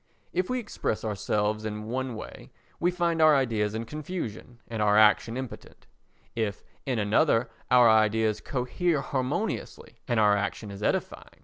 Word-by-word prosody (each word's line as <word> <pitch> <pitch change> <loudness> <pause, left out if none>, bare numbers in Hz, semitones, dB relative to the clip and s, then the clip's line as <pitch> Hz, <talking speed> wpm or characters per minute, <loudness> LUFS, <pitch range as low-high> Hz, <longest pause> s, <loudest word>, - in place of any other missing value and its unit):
If 185 0 0
we 255 - 0
express 205 - -3
ourselves 105 +1 -1
in 105 0 -4
one 130 +1 -3
way 110 - -9 0.3
we 175 - +2
find 170 -2 0
our 155 -1 +7
ideas 110 -6 0
in 115 +1 -3
confusion 135 - -6
and 115 -2 -4
our 105 0 +4
action 110 +2 +4
impotent: 130 -2 -8 0.5
if 110 -4 -2 0.2
in 130 -3 0
another 115 +3 +2 0.2
our 125 -1 +7
ideas 110 -1 +3
cohere 145 +5 -1
harmoniously, 130 -2 -3
and 120 -2 +1
our 105 -1 +5
action 100 +1 -3
is 100 +1 -9
edifying. - - -2
115 Hz, 150 wpm, -27 LUFS, 105-135 Hz, 0.5 s, our